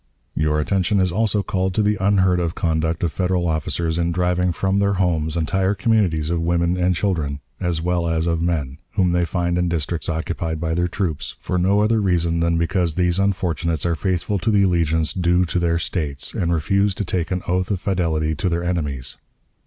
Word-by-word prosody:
"Your 75 0 +1
attention 95 +5 +1
is 95 -1 +2
also 105 +1 +1
called 95 -1 -1
to 110 - +2
the 105 +1 +2
unheard 95 -2 +3
of 85 -1 -1
conduct 80 0 0
of 85 - +1
Federal 90 -2 0
officers 80 +1 -1
in 85 0 +1
driving 90 +1 +1
from 95 +3 0
their 100 0 +2
homes 85 -4 0
entire 95 +4 +1
communities 90 -7 +1
of 85 -1 0
women 85 +1 +1
and 90 0 +1
children, 80 -7 -1 0.2
as 85 -3 -1
well 85 -1 0
as 80 0 0
of 85 -1 0
men, 75 -5 -2
whom 95 -4 +2
they 90 0 +2
find 85 +1 -1
in 90 0 +1
districts 85 0 -2
occupied 80 0 -3
by 80 0 -1
their 90 +1 +1
troops, 85 -5 -3
for 90 - -2
no 100 +3 +3
other 110 +1 +2
reason 85 -3 +1
than 85 0 +1
because 85 -1 0
these 90 0 +1
unfortunates 85 -5 0
are 85 - +2
faithful 95 +3 -1
to 110 - -1
the 100 -2 +4
allegiance 80 -4 +1
due 90 0 +2
to 90 +1 -1
their 85 -1 +1
States, 75 -5 -3
and 85 -1 -1
refuse 95 +5 +1
to 105 - -3
take 85 -2 -2
an 90 -1 -2
oath 90 +1 0
of 100 -3 -1
fidelity 80 -5 0
to 90 +4 -1
their 85 0 -1
enemies. 75 -8 -3
85 Hz, 200 wpm, -21 LUFS, 80-95 Hz, 0.2 s, the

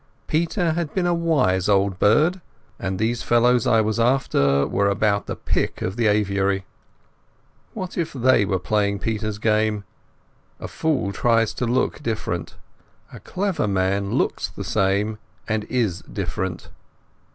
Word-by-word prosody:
Peter 165 +1 0
had 160 -2 -2
been 185 -2 +1
a 175 - +2
wise 135 - +1
old 100 -2 +2
bird, 155 - +3 0.4
and 95 -1 -3
these 115 +3 0
fellows 120 +1 +3
I 115 -3 +4
was 110 +1 -1
after 90 - +2
were 100 +1 +1
about 100 0 +1
the - - -3
pick - - -2
of 95 - -2
the 115 -1 +1
aviary. 100 -2 +1 1.1
What 185 -4 -5
if 165 - -1
they 130 -4 +3
were 95 -1 0
playing 100 +1 0
Peter's 110 0 -3
game? 110 -1 +1 0.8
A - - -6
fool 145 -11 -1
tries 115 -1 +2
to 125 - -2
look 125 +2 0
different: 95 -7 -3 0.6
a - - -9
clever 190 - -2
man 100 0 0
looks - - 0
the - - -8
same 100 +3 0 0.3
and 110 -1 -1
is 110 -8 -1
different. 95 -2 -5
110 Hz, 145 wpm, -22 LUFS, 100-125 Hz, 1.1 s, I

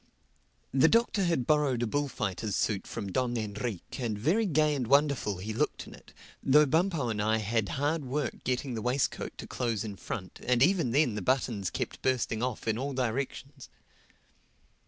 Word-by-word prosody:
The 135 +4 +6
Doctor 225 -2 +3
had 165 -8 +1
borrowed 145 -5 +2
a - - +2
bullfighter's 110 -6 -2
suit 100 -3 0
from 100 -4 -5
Don 120 +3 0
Enrique; 110 +2 -4
and 110 -3 -1
very 180 - +2
gay 155 -3 +3
and 130 -5 -2
wonderful 140 -7 +2
he 105 +4 -5
looked 110 - -1
in - - -12
it, - - -16 0.3
though 150 +3 +6
Bumpo 160 -3 +1
and 105 -2 -1
I 110 +1 +2
had 110 -1 0
hard 145 +3 0
work 135 +1 -3
getting 125 +1 -1
the 110 - -3
waistcoat 125 +4 -1
to - - -7
close 115 -3 -2
in 105 -3 -5
front 95 -1 -6
and 125 0 +3
even 175 -6 +3
then 135 -1 +3
the 105 - -3
buttons 115 -4 0
kept - - -4
bursting 125 -4 0
off 125 -2 -2
it 115 - +2
in 110 - -3
all 140 +2 -2
directions. 130 +2 -3
125 Hz, 180 wpm, -29 LUFS, 110-145 Hz, 0.3 s, The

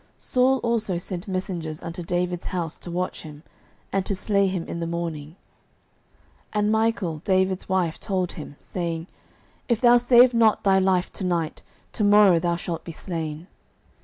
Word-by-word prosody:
09:019:011 - - -34
Saul 260 +1 +2
also 220 -6 0
sent 180 +2 -5
messengers 175 -5 -4
unto 170 +1 -5
David's 175 0 -2
house, 170 -3 -3
to - - -7
watch 180 +1 -3
him, 150 -1 -11 0.5
and 195 -1 +1
to 200 - 0
slay 200 0 +1
him 185 -3 -2
in 170 - -5
the 165 - -3
morning: 165 -2 -4 1.2
and 210 0 +1
Michal 220 -7 0
David's 190 +2 0
wife 180 -4 0
told 185 -3 -1
him, 145 -2 -9
saying, 170 -2 -4 0.6
If 235 -3 +2
thou 240 0 +6
save 245 +1 +6
not 225 -2 +3
thy 195 -1 +4
life 185 -1 +1
to - - -5
night, 170 -3 -1 0.3
to 215 - -2
morrow 205 -4 +6
thou 170 +1 0
shalt 170 -1 -5
be 170 - -7
slain. 160 -2 -5
180 Hz, 165 wpm, -24 LUFS, 170-205 Hz, 1.2 s, thou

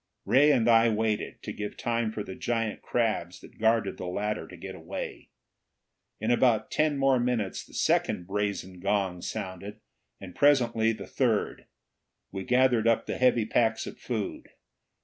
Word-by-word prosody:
Ray 145 +3 +5
and 120 -5 +2
I 115 0 +6
waited, 110 -1 -2
to - - -5
give 105 0 -6
time 115 -1 -1
for 110 -1 -4
the 95 - -7
giant 115 0 -2
crabs 110 -7 -1
that - - -16
guarded 110 -2 +2
the 90 - -5
ladder 105 +4 -2
to - - -12
get - - -8
away. - - -7 0.9
In 110 +3 0
about 120 -3 +2
ten 155 -2 +1
more 135 -2 +3
minutes 120 -5 -1
the - - -16
second 90 - +1
brazen 100 -2 -3
gong 95 -2 -1
sounded, 100 +1 -6 0.4
and 95 -2 -10
presently 120 -6 +3
the 110 - -6
third. 115 -6 -1 0.6
We 95 -1 -5
gathered 125 -2 +3
up 115 -1 +2
the - - -4
heavy 125 -3 +3
packs 115 0 +1
of - - -9
food. 110 -5 -4
110 Hz, 160 wpm, -28 LUFS, 100-120 Hz, 0.9 s, I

